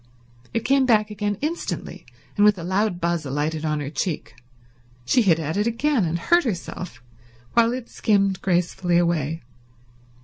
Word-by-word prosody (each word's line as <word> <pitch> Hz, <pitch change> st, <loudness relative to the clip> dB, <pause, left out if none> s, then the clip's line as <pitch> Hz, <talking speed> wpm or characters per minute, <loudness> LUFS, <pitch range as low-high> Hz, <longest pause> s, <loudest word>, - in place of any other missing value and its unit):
It 230 Hz, -, -2 dB
came 270 Hz, 0 st, +3 dB
back 215 Hz, -3 st, +3 dB
again 205 Hz, -1 st, -2 dB
instantly, 320 Hz, +4 st, -4 dB, 0.3 s
and 205 Hz, -, +3 dB
with 210 Hz, -1 st, +5 dB
a 170 Hz, -, -6 dB
loud 190 Hz, +1 st, 0 dB
buzz 170 Hz, -1 st, 0 dB
alighted 150 Hz, +3 st, -2 dB
on 150 Hz, -1 st, -1 dB
her 140 Hz, 0 st, -5 dB
cheek. 160 Hz, -, -3 dB, 0.7 s
She 245 Hz, -, +3 dB
hit 180 Hz, -7 st, +4 dB
at 160 Hz, +2 st, -3 dB
it 210 Hz, +2 st, +1 dB
again 235 Hz, -1 st, +1 dB
and 165 Hz, +1 st, -1 dB
hurt 345 Hz, -, +3 dB
herself, 180 Hz, -, -5 dB, 0.5 s
while 235 Hz, 0 st, +4 dB
it 250 Hz, -1 st, -5 dB
skimmed 200 Hz, -3 st, +1 dB
gracefully 175 Hz, -1 st, +1 dB
away. 165 Hz, -3 st, 0 dB
185 Hz, 160 wpm, -23 LUFS, 165-225 Hz, 0.7 s, with